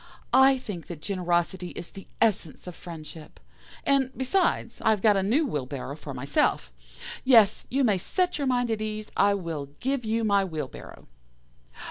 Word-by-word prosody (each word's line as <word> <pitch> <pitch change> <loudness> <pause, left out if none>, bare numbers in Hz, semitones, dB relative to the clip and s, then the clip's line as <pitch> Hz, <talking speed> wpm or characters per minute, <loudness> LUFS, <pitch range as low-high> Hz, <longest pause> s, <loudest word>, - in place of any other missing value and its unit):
I 265 0 +6
think 205 -9 -7
that 170 -4 -7
generosity 180 0 -1
is 170 - -7
the 195 - -11
essence 195 -8 0
of 180 - -7
friendship, 160 -2 -10 0.5
and, 275 -2 +3
besides, 265 -3 0
I 220 - +4
have 215 -3 +2
got 215 -2 +5
a 195 - +2
new 245 +12 +2
wheelbarrow 140 - -4
for 150 -2 -9
myself. 125 - 0 0.5
Yes, 230 -6 +5
you 270 +2 +1
may 205 -6 +3
set 360 - 0
your 280 - 0
mind 245 -2 +1
at 220 -1 -1
ease, 215 0 -4
I 200 0 +4
will 165 -7 -4
give 265 0 -1
you 225 +1 0
my 200 -2 +3
wheelbarrow. 155 -8 -7
200 Hz, 165 wpm, -26 LUFS, 170-245 Hz, 0.5 s, I